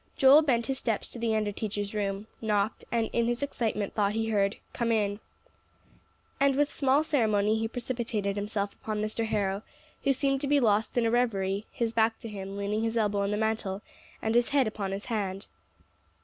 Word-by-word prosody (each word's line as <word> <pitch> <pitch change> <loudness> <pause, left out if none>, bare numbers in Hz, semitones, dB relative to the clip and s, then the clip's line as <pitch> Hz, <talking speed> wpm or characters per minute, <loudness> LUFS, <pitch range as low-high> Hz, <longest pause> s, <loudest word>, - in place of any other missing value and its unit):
Joel 275 +2 +8
bent 245 -6 +1
his 270 -1 -1
steps 225 -4 -2
to 240 - -9
the 230 -1 +1
under 210 -1 0
teacher's 205 -1 -3
room, 200 -1 -2 0.2
knocked, 210 -1 0
and 230 -1 +1
in 235 0 +2
his 240 +3 -1
excitement 220 -7 -2
thought 205 -1 +1
he 225 0 -1
heard, 200 -1 +2 0.2
"Come 235 -1 0
in." 205 -2 +1 1.2
And 275 -1 +4
with 290 +1 +1
small 275 +2 +3
ceremony 220 -7 +2
he 225 - 0
precipitated 230 -4 -2
himself 205 0 -2
upon 215 -1 -4
Mr. 215 +2 -1
Harrow, 200 -2 0 0.4
who 275 - +3
seemed 275 0 +1
to 285 - 0
be 290 +1 +4
lost 215 -1 +2
in 240 - +3
a 225 - +2
revery, 205 -4 0
his 230 -1 -1
back 225 0 +2
to - - -6
him, 195 -1 -6
leaning 205 +2 -1
his 225 +1 0
elbow 210 -2 +1
on 200 - 0
the 210 - 0
mantel, 220 -2 -1 0.4
and 220 - +1
his 240 0 +3
head 280 -2 +3
upon 205 -3 -3
his 195 +1 -4
hand. 200 -4 -2
220 Hz, 195 wpm, -29 LUFS, 205-235 Hz, 1.2 s, Joel